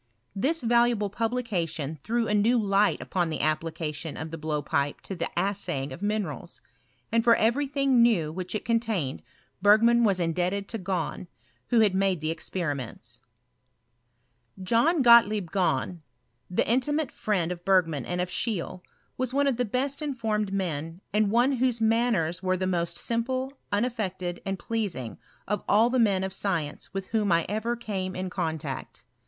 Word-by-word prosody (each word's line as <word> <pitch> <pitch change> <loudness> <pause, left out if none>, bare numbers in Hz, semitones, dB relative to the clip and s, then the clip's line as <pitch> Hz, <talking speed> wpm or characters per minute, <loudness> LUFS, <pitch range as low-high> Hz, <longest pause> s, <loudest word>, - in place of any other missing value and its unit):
This 280 +11 0
valuable 235 -3 +2
publication 185 - -2
threw 230 +1 0
a - - 0
new 220 +4 +3
light 205 -1 +2
upon 175 -3 -1
the 155 - -3
application 155 0 -2
of 160 0 -6
the 165 - -5
blowpipe 145 -2 -1
to 195 - -6
the 170 - -3
assaying 175 -8 -1
of 150 - -10
minerals; 210 -1 -3 0.5
and 230 0 +3
for 235 0 +6
every 245 +6 +2
thing 275 -3 +2
new 195 -10 +3
which 180 +4 -5
it 215 - -3
contained 225 - -1 0.4
Bei^roan 230 +3 +6
wa» 210 - +5
indebted 180 +4 -1
to 225 - -4
Gahn, 185 -2 -3 0.4
who 235 -2 +4
had 205 -3 +4
made 190 -2 +1
the 155 +1 -1
experim^ts, 140 -9 -5 1.4
John 260 - +3
Gottlieb 215 -7 +6
Gahn, 180 -2 0 0.5
the 180 - 0
intimate 275 +5 +1
friend 185 -5 -1
of 175 -1 -6
Berg 185 -1 +4
man 150 -5 -4
and 180 0 -3
of 180 0 -1
Scheele, 185 -5 -2 0.4
was 255 0 -1
one 285 0 +3
of 270 -4 +1
the 250 - +1
best 265 +6 -1
informed 220 -8 -1
men, 165 -3 -3
and 210 -1 +3
one 240 +5 +3
whose 245 -1 +1
manners 225 -7 +1
were 185 -1 +1
the 185 - -1
most 170 -2 -1
simple, 255 +3 -1 0.2
uoaiFected, 205 -6 -2
and 195 0 -1
pleasing, 200 - -3 0.3
of 210 - -1
all 225 +4 +5
the 255 - +2
men 200 -5 +3
of 190 -1 -3
science 170 -7 -2
with 195 -1 -5
whom 215 -4 +1
I 170 0 +3
ever 220 +4 -1
came 195 -5 -4
in 185 0 -4
contact. 160 -6 -4
200 Hz, 160 wpm, -27 LUFS, 170-230 Hz, 1.4 s, for